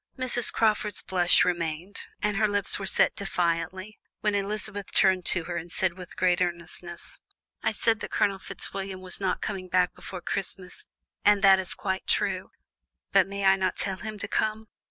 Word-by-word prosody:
Miss 250 -2 +1
Crawford's 210 -2 +1
blush 180 -2 +4
remained, 175 +2 -2 0.2
and 210 0 +1
her 215 0 +3
lips 205 -1 +1
were 195 - -4
set - - +4
rather - - -49
defiantly, 185 +2 -2 0.2
when 210 -1 +1
Elizabeth 205 0 -2
turned 185 -2 +3
to 175 - +3
her 175 +1 -4
and 170 +1 -6
said 185 0 +1
with 180 -1 -11
great 180 -1 +2
earnestness: 175 0 -5 0.4
"I 220 - +1
said 225 +1 +1
that - - -6
Colonel 200 -2 +1
Fitzwilliam 190 0 -6
was 185 +1 -4
not 190 - 0
coming 190 -3 -4
back 180 0 +2
before 185 -2 -8
Christmas, 190 0 -4 0.4
and 205 0 +4
that 195 -1 +7
is 185 - 0
quite 190 -1 -3
true, - - 0 0.6
but - - +5
may 200 0 -3
I 190 0 +7
not 185 -1 0
tell 190 -1 -1
him 215 +2 -6
to 200 - -4
come? 220 +1 -1
190 Hz, 180 wpm, -27 LUFS, 180-205 Hz, 0.6 s, that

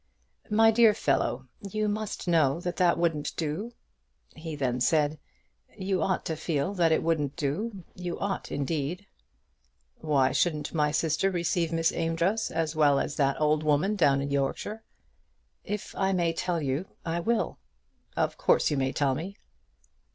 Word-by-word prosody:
"My 225 +1 +5
dear 225 -2 +5
fellow, 135 -1 0
you 210 +2 -2
must 210 -2 -3
know 160 -3 +3
that 175 0 -4
that 175 -2 +3
wouldn't 165 -3 -1
do." 165 +9 -3 0.6
He 160 -1 -6
then 125 -3 -1
said, 150 +1 +2 0.6
"You 190 -1 -1
ought 185 - 0
to 160 - -2
feel 160 +2 -1
that 170 -4 +2
it 160 - +2
wouldn't 150 -4 0
do; 180 +7 -3
you 180 -1 -5
ought 200 -1 -3
indeed." 145 +4 -2 0.9
"Why 140 -4 +2
shouldn't 150 -2 0
my 150 -2 +2
sister 155 +4 +1
receive 170 -2 0
Miss 165 0 +2
Amedroz 170 +6 0
as 160 -1 -2
well 145 -3 +4
as 150 - -2
that 140 -1 +1
old 150 0 +2
woman 155 +7 +2
down 140 -7 +3
in 140 - -4
Yorkshire?" 140 +10 -2 0.8
"If 210 0 -5
I 195 0 +1
may 170 -2 +1
tell 170 +1 -1
you, 145 +5 -2 0.2
I 165 +1 -1
will." 230 +6 -1 0.6
"Of - - 0
course - - +3
you 145 - 0
may 135 0 0
tell 140 -2 +1
me." 180 +9 -5
165 Hz, 160 wpm, -28 LUFS, 145-185 Hz, 0.9 s, My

